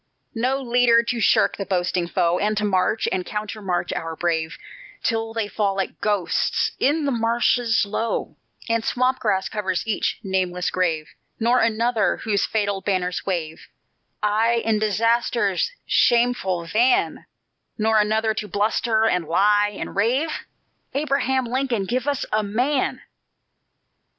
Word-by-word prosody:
"No 255 +4 0
leader 240 -2 +3
to 235 0 -2
shirk - - +3
the 195 - -4
boasting 180 -1 0
foe, 170 +1 +1
And 210 +1 0
to 210 - 0
march 200 +2 +1
and 185 - -1
countermarch 200 -4 -3
our 165 0 -4
brave, 160 -1 -1 0.5
Till 225 0 -1
they 225 -2 -2
fall 205 -2 -1
like 195 -1 -4
ghosts 205 -4 0
in 295 +2 +2
the 280 - +1
marshes 230 -1 +2
low, 220 +3 -3 0.3
And 230 -1 0
swamp 255 +2 +1
grass 195 -4 0
covers 190 -2 -2
each 220 -2 -1
nameless 185 -2 -1
grave; 165 -4 -1 0.3
Nor 240 +2 +3
another, 230 0 +1
whose 205 -3 0
fatal 205 -3 -1
banners 185 -2 -2
wave 160 -4 -3 0.6
Aye 225 +2 +2
in 220 -1 +2
Disaster's 220 - +1
shameful 235 -8 +2
van; 245 - +1 0.5
Nor 220 0 +3
another, 220 +1 +1
to 210 -1 -4
bluster, 220 +2 +1
and 180 -7 +1
lie, 205 +4 +3
and - - -6
rave; 250 +10 +1 0.6
Abraham 270 -3 0
Lincoln, 245 -4 -1
give 250 +7 -2
us 285 -2 0
a 215 - +3
MAN! 250 +7 -1
215 Hz, 135 wpm, -22 LUFS, 190-235 Hz, 0.6 s, leader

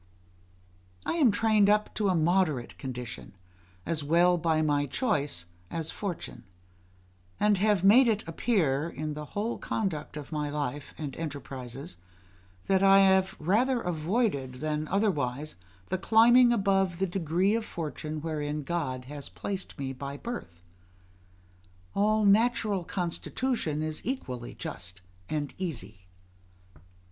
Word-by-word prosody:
I - - 0
am 285 -7 +6
trained 210 -1 +3
up 210 0 +2
to 205 -2 +1
a 185 - +2
moderate 160 -6 +1
condition, 125 -6 -7 0.5
as 155 -3 -1
well 170 +4 +4
by 160 -1 +2
my 145 -1 +1
choice 145 - -1 0.2
as 160 -1 -3
fortune; 175 - -5 1.0
and 210 -2 +3
have 205 -2 +3
made 235 +6 +7
it 220 -4 0
appear, 165 - +1
in 155 -1 -4
the 150 0 -6
whole 225 +3 -1
conduct 160 -9 -3
of 145 - -8
my 150 -1 -2
life 145 -1 -4
and 145 -4 -5
enterprises, 135 - -6 0.7
that 190 -1 +3
I 195 0 +7
have 190 -1 +4
rather 235 +10 +2
avoided 165 - -1
than 155 +2 -2
otherwise 155 - 0 0.3
the 185 - -1
climbing 240 +4 +6
above 195 -5 +2
the 190 - +1
degree 180 +2 +1
of 230 0 0
fortune 155 -4 -5
wherein 150 -2 -3
God 135 -5 -2
has 145 +1 -7
placed 195 -1 -5
me 135 -1 -3
by 140 +1 -6
my - - -7
birth; 90 - -7 1.3
all 215 +1 +2
natural 210 -2 +3
constitution 175 - -2
is 155 -1 -3
equally 130 - -4
just 90 +1 -6 0.3
and 145 -2 -2
easy. 115 - -6
165 Hz, 130 wpm, -29 LUFS, 145-200 Hz, 1.3 s, made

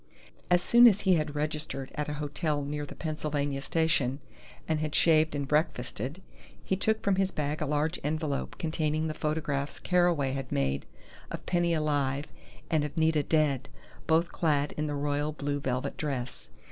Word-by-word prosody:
As 180 0 +4
soon 240 +1 +8
as 205 -3 +4
he 190 -2 +4
had 155 -3 0
registered 150 -3 -3
at 150 0 -3
a - - -2
hotel 150 0 -1
near 145 +1 -3
the - - -10
Pennsylvania 145 -3 -2
Station, 145 -5 +1 0.5
and 160 -1 +1
had 155 -1 -2
shaved 155 -2 +4
and 140 -1 -2
breakfasted, 140 - -1 0.4
he 190 - 0
took 220 +3 +1
from 200 -2 +2
his 190 -1 +2
bag 150 -2 -2
a 150 - 0
large 150 +3 0
envelope 150 -1 -2
containing 155 -1 -1
the 155 - -2
photographs 150 -2 -2
Carraway 175 -7 +2
had 135 -1 -4
made 70 0 0 0.4
of - - -6
Penny 175 -1 +2
alive 145 -2 0 0.5
and 155 -2 +3
of 150 +2 -5
Nita 160 -1 +3
dead, 145 -3 +1 0.4
both 165 +1 +3
clad 150 -3 +1
in 150 0 -3
the 145 - -2
royal 145 +1 -1
blue 145 -1 -2
velvet 130 -2 -2
dress. 135 -5 -4
150 Hz, 170 wpm, -29 LUFS, 145-160 Hz, 0.5 s, soon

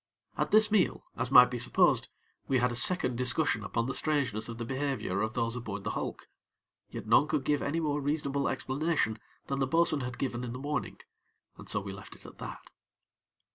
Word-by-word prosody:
At - - -1
this 215 0 +5
meal, 205 -5 +1
as 125 - -2
might 125 -1 +7
be 125 - -3
supposed, 120 - +3 0.4
we 135 - +2
had 125 0 +1
a - - -4
second 125 -3 +3
discussion 125 -2 +2
upon 115 +3 -2
the 135 - -3
strangeness 130 -9 -1
of 115 - -7
the 115 - -5
behavior 130 -7 -2
of 110 +1 -3
those 115 -1 0
aboard 105 -5 -6
the - - -2
hulk; - - -5 0.6
yet - - -8
none 115 +7 +4
could 150 -4 -1
give 145 +1 0
any 155 +4 -1
more 150 -2 -1
reasonable 140 -1 -1
explanation 135 -4 -1 0.3
than 140 0 -3
the 135 - +1
bo'sun 165 +1 +4
had 125 -1 -5
given 125 -2 -3
in 120 -1 -5
the - - -6
morning, 145 +2 -4 0.6
and - - -11
so 105 - +3
we 100 -1 -7
left 100 - -11
it - - -17
at - - -13
that. - - -9
130 Hz, 205 wpm, -29 LUFS, 115-145 Hz, 0.6 s, might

